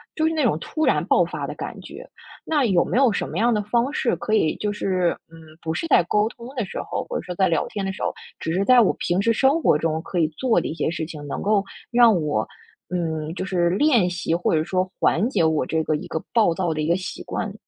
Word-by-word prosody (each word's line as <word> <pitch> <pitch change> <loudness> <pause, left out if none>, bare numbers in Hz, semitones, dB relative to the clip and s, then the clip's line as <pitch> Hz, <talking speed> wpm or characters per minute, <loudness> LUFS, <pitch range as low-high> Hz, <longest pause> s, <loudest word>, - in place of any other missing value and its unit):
就 315 0 +1
是 325 - 0
那 310 -2 0
种 225 - +2
突 310 - -3
然 - - +2
爆 - - +4
发 - - -4
的 - - -6
感 - - -7
觉。 - - -11 0.4
那 300 -4 +1
有 185 -6 +3
没 - - -2
有 260 -3 +5
什 200 - -2
么 - - -5
样 235 +2 +3
的 210 - +1
方 235 +5 0
式 250 - +1
可 215 - -3
以 160 -8 +2
就 210 -1 -2
是， 185 -4 0 0.2
嗯， 165 - -13 0.2
不 160 -1 -3
是 330 - -3
在 280 - +5
沟 210 +5 +1
通 235 - -12
的 235 - 0
时 195 - -6
候， - - -4
或 - - -3
者 - - -3
说 180 - -5
在 190 +1 +3
聊 165 -3 +1
天 200 -2 -4
的 195 - -2
时 - - -7
候， - - -1 0.2
只 160 - -3
是 190 +3 +1
在 250 +1 +7
我 215 - +3
平 175 +2 0
时 230 - +2
生 270 +7 +3
活 150 - +4
中 160 0 -1
可 180 0 -3
以 160 - +3
做 255 -3 +2
的 - - -3
一 - - -4
些 165 - -1
事 160 -1 -3
情， 150 -2 -9
能 - - -4
够 205 -1 +2 0.3
让 235 -5 +5
我， 110 -8 0 0.4
嗯， 160 -3 -3
就 190 - -4
是 175 -3 +1
练 230 - +3
习 175 -2 -1
或 175 - 0
者 155 - +3
说 185 +1 -1
缓 210 +9 +2
解 215 - +1
我 155 -4 +1
这 160 +4 -1
个 155 - +1
一 150 - -5
个 160 - -3
暴 220 -7 +4
躁 175 -2 -1
的 155 - -3
一 150 - -1
个 170 - +3
习 185 - -6
惯？ 210 -3 -4
185 Hz, 290 characters per minute, -23 LUFS, 165-230 Hz, 0.4 s, 在